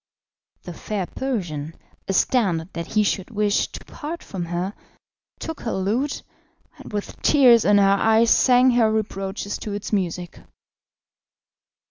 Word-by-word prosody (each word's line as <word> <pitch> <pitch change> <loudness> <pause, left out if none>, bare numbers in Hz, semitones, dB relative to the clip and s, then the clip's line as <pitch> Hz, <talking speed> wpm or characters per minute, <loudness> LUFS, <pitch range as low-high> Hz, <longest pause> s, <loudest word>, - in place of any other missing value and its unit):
The 175 - -7
fair 200 +2 -4
Persian, 170 - -4 0.3
astounded 190 -4 +1
that 170 0 -5
he 215 - +2
should 195 -1 -1
wish 210 -2 +1
to - - -11
part 330 +2 -7
from 180 -3 -5
her, 175 +3 -3 0.6
took 320 -2 -6
her 225 - -3
lute, 225 +10 -1 0.6
and - - -11
with 205 -1 -5
tears 250 -6 +5
in 205 0 +5
her 200 0 +4
eyes 225 +1 +4
sang 255 0 +5
her 235 -3 +3
reproaches 200 -2 -3
to 210 - -5
its 205 +1 -5
music. 180 -3 -2
205 Hz, 135 wpm, -23 LUFS, 185-235 Hz, 0.6 s, tears